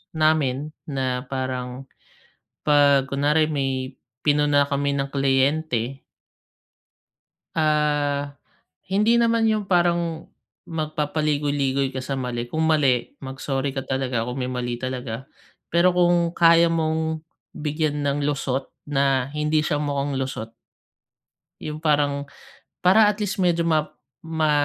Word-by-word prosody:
namin 155 -3 +1 0.2
na 130 -3 -2
parang 130 0 -4 0.8
'pag 140 -2 +5
kunwari, 150 +3 +2
may 135 -2 -2 0.3
pinuna 145 -1 +3
kami 140 0 0
na 135 - -1
kliyente 135 -2 0 1.5
ah, 145 -2 +1 0.5
hindi 210 +5 +3
naman 230 -1 +2
yung 210 -2 -1
parang 170 -2 +1 0.3
magpapaligoy-ligoy 145 -3 -1
ka 130 - -4
sa 135 +2 -3
mali. 125 -2 -3
Kung 160 +5 -1
mali, 145 -6 +2
mag-sorry 135 0 -3
ka 135 - -2
talaga 130 -3 -1
kung 125 +3 -5
may 125 - -2
mali 120 -1 -3
talaga. 130 -1 -5 0.4
Pero 170 +2 +3
kung 175 -1 +3
kaya 170 -1 +5
mong 160 -1 0 0.3
bigyan 150 -1 -2
ng 140 +1 0
lusot 135 -2 -2 0.2
na 135 -2 +1
hindi 150 +1 +1
siya 150 -1 0
mukhang 140 -1 -1
lusot 130 -4 -4 1.1
yung 150 0 -5
parang 145 -2 +1 0.6
para 200 +4 +6
at 210 -1 +1
least 200 -1 -3
medyo 175 -2 +2
ma 155 -2 +1 0.4
ma 160 -2 0
145 Hz, 115 wpm, -23 LUFS, 135-160 Hz, 1.5 s, para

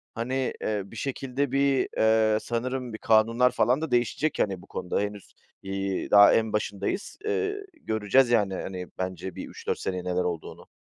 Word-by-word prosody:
Hani, 130 +3 -1
eee, 105 -2 -1
bir 100 - -14
şekilde 135 +1 -2
bir, 135 -1 +2
eee, 110 -1 +4
sanırım 125 0 -3
bir - - -5
kanunlar 115 +3 +3
falan 125 +4 +2
da 160 - -3
değişecek, 125 +5 0
hani, 95 -3 0
bu - - -16
konuda 90 - -3
henüz, 105 -1 -5 0.3
iii, 95 0 -3
daha 100 0 +8
en 110 -1 +1
başındayız. 105 - -2
Eee, 405 -2 -1 0.2
göreceğiz 110 +4 +2
yani, 105 -5 +2
hani, 90 -1 -5
bence 95 0 -4
bir - - -6
3-4 - - -4
seneye 90 -1 -3
neler 90 0 0
olduğunu. 85 -3 -5
110 Hz, 165 wpm, -27 LUFS, 100-130 Hz, 0.3 s, daha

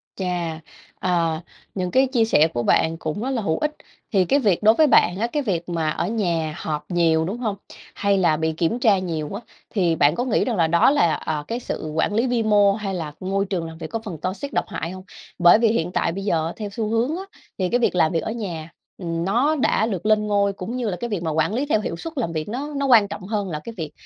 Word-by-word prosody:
Chà, 175 -4 -3 0.4
à, 170 -3 0 0.3
những 180 -2 -2
cái 265 +5 +4
chia 245 -4 +2
sẻ 160 -8 +4
của 120 - -1
bạn 160 +6 +2
cũng 160 +4 -4
rất 255 - -2
là 255 -4 -1
hữu 160 -6 0
ích. 300 - 0 0.4
Thì 190 -3 +3
cái 280 +11 +3
việc 205 -7 +1
đối 215 +1 +7
với 310 +3 +5
bạn 180 -9 +4
á, 230 - +1
cái 295 +4 -2
việc 180 -7 -2
mà 165 -2 0
ở 165 +2 -1
nhà 170 -8 -1
họp 150 -1 -4
nhiều, 165 -2 +3
đúng 195 +7 -3
hông? 220 -5 -2 0.4
Hay 200 -1 +2
là 170 -5 +3
bị 160 0 0
kiểm 170 +9 0
tra 220 -6 +4
nhiều 165 -5 -3
á, 200 - -5 0.3
thì 175 -6 +1
bạn 145 +1 +3
có 245 - -1
nghĩ 245 - +1
rằng 245 - -1
là 165 -4 +3
đó 170 +7 +4
là, 175 - +3
ờ, 150 -2 -3
cái 235 - -3
sự 155 -9 -5
quản 160 +5 +1
lý 230 +4 +2
vi 240 -2 +1
mô 205 -2 +4
hay 200 -2 -4
là 160 -5 -4
môi 195 +1 -1
trường 185 -4 -2
làm 160 0 -10
việc - - -6
có 225 - -3
phần 185 -6 -5
toxic, 200 +10 -4
độc - - +1
hại 165 +2 -4
hông? 185 0 -9 0.4
Bởi 175 +4 +7
vì 230 - +4
hiện 180 -6 0
tại 170 - 0
bây 195 +3 -5
giờ, 165 -4 0
theo 210 -2 -5
xu 215 +2 -3
hướng 235 +7 +1
á, 380 - -5 0.3
thì 185 -2 0
cái 245 - +2
việc 235 - +1
làm 160 -3 +3
việc 165 - -1
ở - - -3
nhà, 175 -8 -5 0.3
ừm, 170 -2 -3
nó 245 +11 +2
đã 255 -6 +2
được 200 -4 -3
lên 215 0 +3
ngôi, 200 -1 +2
cũng 195 +5 -6
như 245 -3 -1
là 180 - -3
cái 240 - -3
việc 200 -6 -2
mà 160 - -1
quản 160 +6 +1
lý 260 +5 0
theo 250 -7 +1
hiệu 205 - -3
suất 325 - -7
làm 225 -10 -1
việc, 155 +2 -4
nó 280 +6 -4
nó 280 - 0
quan 230 -6 +6
trọng 200 +1 -7
hơn 205 -2 -2
là 155 -3 -3
cái 230 - -7
việc, 160 -4 -5
195 Hz, 265 wpm, -22 LUFS, 165-225 Hz, 0.4 s, đối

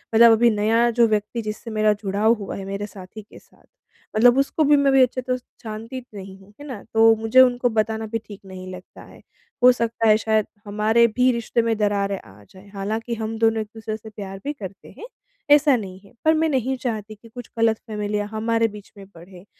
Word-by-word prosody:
मतलब 230 +1 +8
अभी 230 +1 +4
नया 225 +2 +2
जो 235 0 +3
व्यक्ति 215 +2 -2
जिससे 215 +2 -6
मेरा 215 -1 +2
जुड़ाव 205 +3 +2
हुआ 205 -4 -6
है 195 - -7
मेरे 200 +1 -4
साथी 190 +2 -11
के 210 - -16
साथ, - - -27 0.5
मतलब 240 +3 +5
उसको 275 +3 +1
भी 295 0 +5
मैं 280 -1 +3
अभी 270 0 +5
अच्छी 255 +1 -1
तरह 255 0 -2
से 250 - -19 0.2
जानती 225 +3 -7
नहीं 195 -1 -10
हूँ, 195 +2 -20
है 290 - -10
ना। 245 -7 -8
तो 225 0 +6
मुझे 225 +4 +4
उनको 245 -1 +3
बताना 220 0 -1
भी 225 +1 -2
ठीक 205 -1 -11
नहीं 185 -1 -10
लगता 180 0 -12
है, - - -16 0.4
हो 250 - +9
सकता 230 -2 -1
है 215 0 +6
शायद 220 -1 +1 0.2
हमारे 215 +3 +2
भी 250 +3 +2
रिश्ते 235 0 -1
में 230 0 0
दरारें 200 -2 0
आ 100 +2 -17
जाएँ। 190 +2 -17
हालाँकि 220 +4 -3
हम 225 0 -4
दोनों 225 -1 +2
एक-दूसरे 220 0 -6
से 220 0 -12
प्यार 195 -2 -8
भी 290 - -3
करते 200 -7 -10
हैं, - - -9 0.5
ऐसा 290 -1 +6
नहीं 190 -5 -6
है - - -19
पर 315 - +5
मैं 320 +1 +1
नहीं 265 -2 0
चाहती 220 -4 -5
कि 230 +2 -18 0.3
गलत 225 -1 +2
फ़ैमिलियाँ 210 -1 -3
हमारे 225 +1 0
बीच 210 -2 -12
में 200 - -11
बढ़े 175 +2 -14
220 Hz, 215 wpm, -22 LUFS, 205-235 Hz, 0.5 s, हो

